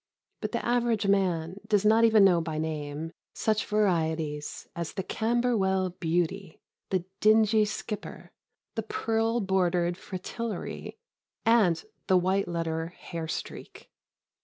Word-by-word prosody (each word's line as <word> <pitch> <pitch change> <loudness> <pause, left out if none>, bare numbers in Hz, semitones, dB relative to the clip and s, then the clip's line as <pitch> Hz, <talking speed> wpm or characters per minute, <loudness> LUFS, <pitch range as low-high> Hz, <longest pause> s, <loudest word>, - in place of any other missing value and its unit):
But - - -3
the - - -2
average 235 -3 +1
man 185 -3 +1
does 210 -1 +2
not 220 +2 +5
even 220 -3 +6
know 175 -3 +5
by 160 -1 -4
name 155 0 -3 0.2
such 215 -1 0
varieties 160 -7 0
as 170 -2 -4
the 190 - -3
Camberwell 220 -5 +1
Beauty, 175 +1 -2 0.3
the 185 -2 0
Dingy 215 0 +5
Skipper, 210 0 -6 0.4
the 225 - -2
Pearl 225 +1 0
bordered 180 -2 +1
Fritillary, 210 - -5 0.5
and 210 -8 +4 0.2
the 185 - +5
White 190 +2 +1
letter 165 0 -3 0.2
Hairstreak. 165 -2 -6
190 Hz, 115 wpm, -28 LUFS, 170-215 Hz, 0.5 s, even